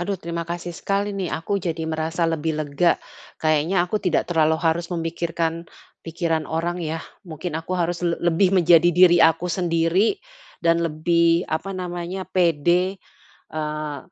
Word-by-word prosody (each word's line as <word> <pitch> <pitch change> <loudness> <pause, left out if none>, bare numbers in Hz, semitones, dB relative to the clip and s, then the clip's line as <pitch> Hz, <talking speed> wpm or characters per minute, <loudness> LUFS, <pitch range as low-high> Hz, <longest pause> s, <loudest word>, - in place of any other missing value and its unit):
Aduh 195 +3 -2
terima 170 -1 -4
kasih 175 0 -4
sekali 200 +3 -1
nih, 190 -3 -2
aku 195 +5 -2
jadi 165 -2 -3
merasa 160 +2 -1
lebih 160 -1 -1
lega. 155 +3 +1 0.4
Kayaknya 155 +3 +1
aku 205 +4 -2
tidak 180 -5 +1
terlalu 160 -2 +2
harus 170 0 0
memikirkan 165 0 -2 0.3
pikiran 165 -1 -2
orang 170 +2 -2
yah. 160 0 -4 0.2
Mungkin 165 -2 -6
aku 165 +3 -4
harus 175 0 -1
le 170 -1 +1
lebih 175 +2 +2
menjadi 170 -1 +6
diri 175 0 +6
aku 165 +2 +3
sendiri 175 - +1 0.5
dan 165 0 +3
lebih, 170 +1 +2
apa 160 +5 -3
namanya, 180 +1 -4
pede, 180 +1 +2 0.6
eee, 150 -1 -4
170 Hz, 145 wpm, -23 LUFS, 160-175 Hz, 0.6 s, menjadi